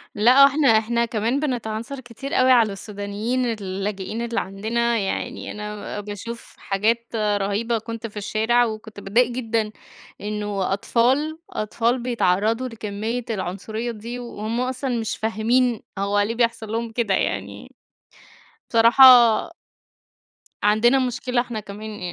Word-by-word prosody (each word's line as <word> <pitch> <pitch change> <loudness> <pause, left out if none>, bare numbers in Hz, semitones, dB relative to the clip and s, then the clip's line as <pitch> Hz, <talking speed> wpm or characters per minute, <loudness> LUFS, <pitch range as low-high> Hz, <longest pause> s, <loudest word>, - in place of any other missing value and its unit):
لأ 245 +6 +6
وإحنا 280 +1 +4
إحنا 235 +2 +1
كمان 230 +4 -1
بنتعنصر 245 -1 -3
كتير 260 +3 -8
أوي 255 0 +4
على 230 -5 +4
السودانيين 205 +5 -3
اللاجئين 200 -1 -3
اللي 235 0 -1
عندنا، 230 +5 -1
يعني 195 -1 -3
أنا 210 0 -6
باشوف 210 +3 -8
حاجات 225 +4 0
رهيبة، 210 +2 0
كنت 230 +1 -6
في 210 - -13
الشارع 220 +4 +2
وكنت 215 -1 -7
باتضايق 230 +5 +2
جدًا 225 -3 -1 0.5
إنه 205 -2 -2
أطفال، 265 +10 +1
أطفال 230 +4 -1
بيتعرضوا 230 0 +1
لكمية 225 +1 -4
العنصرية 215 +3 -3
دي، 235 +2 -7
وهُم 235 -1 -4
أصلًا 255 -1 -2
مش 220 -1 -3
فاهمين 225 +2 +1 0.2
هو 200 +1 +1
ليه 210 +3 0
بيحصل 230 -2 0
لهم 230 0 -2
كده 225 -3 0
يعني. - - -3 1.0
بصراحة 230 +3 +6 1.6
عندنا 220 +5 +4
مشكلة 245 0 -1
إحنا 240 -3 -4
كمان 210 +1 -8
225 Hz, 120 wpm, -23 LUFS, 210-240 Hz, 1.6 s, لأ